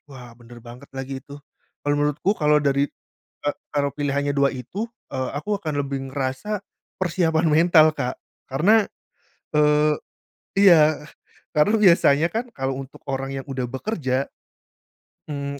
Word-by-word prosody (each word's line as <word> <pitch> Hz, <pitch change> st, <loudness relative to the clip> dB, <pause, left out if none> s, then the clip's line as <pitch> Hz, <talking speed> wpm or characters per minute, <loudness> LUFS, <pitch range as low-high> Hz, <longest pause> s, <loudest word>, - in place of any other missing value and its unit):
Wah, 125 Hz, -3 st, -11 dB
bener 120 Hz, 0 st, -15 dB
banget 120 Hz, +4 st, -12 dB
lagi 135 Hz, 0 st, -5 dB
itu. 140 Hz, +3 st, -11 dB, 0.4 s
Kalau 145 Hz, 0 st, +1 dB
menurutku 150 Hz, +6 st, +1 dB
kalau 150 Hz, -1 st, +4 dB
dari 140 Hz, 0 st, +1 dB, 0.5 s
ka 145 Hz, -, 0 dB, 0.2 s
kalau 140 Hz, -1 st, +1 dB
pilihannya 145 Hz, 0 st, -1 dB
2 140 Hz, -1 st, +2 dB
itu, 180 Hz, -, -5 dB, 0.2 s
eee, 130 Hz, -1 st, -3 dB
aku 205 Hz, +7 st, -2 dB
akan 155 Hz, -7 st, -2 dB
lebih 135 Hz, -1 st, -4 dB
ngerasa 140 Hz, +10 st, -2 dB, 0.4 s
persiapan 170 Hz, -2 st, +1 dB
mental, 160 Hz, 0 st, +6 dB
Kak. 125 Hz, -4 st, -3 dB, 0.3 s
Karena, 200 Hz, +11 st, +3 dB, 0.7 s
eee, 150 Hz, 0 st, +4 dB, 0.7 s
iya, 155 Hz, -6 st, +5 dB, 0.5 s
karena 150 Hz, +9 st, +4 dB
biasanya 170 Hz, -6 st, +5 dB
kan 235 Hz, +4 st, -3 dB
kalau 135 Hz, -, -3 dB
untuk 135 Hz, 0 st, -10 dB
orang 135 Hz, 0 st, -2 dB
yang 135 Hz, -, -5 dB
udah 130 Hz, -2 st, -3 dB
bekerja, 135 Hz, -, -2 dB, 1.0 s
mmm, 140 Hz, -1 st, -4 dB
145 Hz, 135 wpm, -23 LUFS, 135-160 Hz, 1.0 s, mental